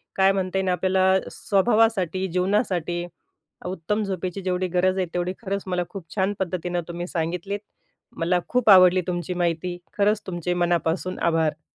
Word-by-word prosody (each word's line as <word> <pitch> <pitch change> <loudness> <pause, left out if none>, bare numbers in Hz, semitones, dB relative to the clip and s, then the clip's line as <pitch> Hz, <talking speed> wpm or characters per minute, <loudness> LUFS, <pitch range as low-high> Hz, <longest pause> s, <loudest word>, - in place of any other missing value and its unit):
काय 195 0 +5
म्हणता 190 -1 -1
येईल 190 -1 0
आपल्याला 190 +1 +3
स्वभावासाठी 195 -3 +2
जीवनासाठी 180 -2 0 0.6
उत्तम 190 +4 -2
झोपेची 190 -1 -3
जेवढी 185 0 -1
गरज 185 +1 +2
आहे 185 - +1
तेवढी 180 +1 -1
खरंच 200 -2 -3
मला 180 -1 0
खूप 195 -5 -8
छान 195 0 +1
पद्धतीनं 180 -1 -2
तुम्ही 175 +1 -4
सांगितलीत. 180 +5 -3 0.6
मला 175 +2 +1
खूप 250 -3 +2
आवडली 185 -1 +7
तुमची 175 0 -2
माहिती 175 0 -1 0.2
खरंच 210 +1 +2
तुमचे 175 -1 -2
मनापासून 175 +1 0
आभार. 160 -2 +1
185 Hz, 145 wpm, -24 LUFS, 175-190 Hz, 0.6 s, आवडली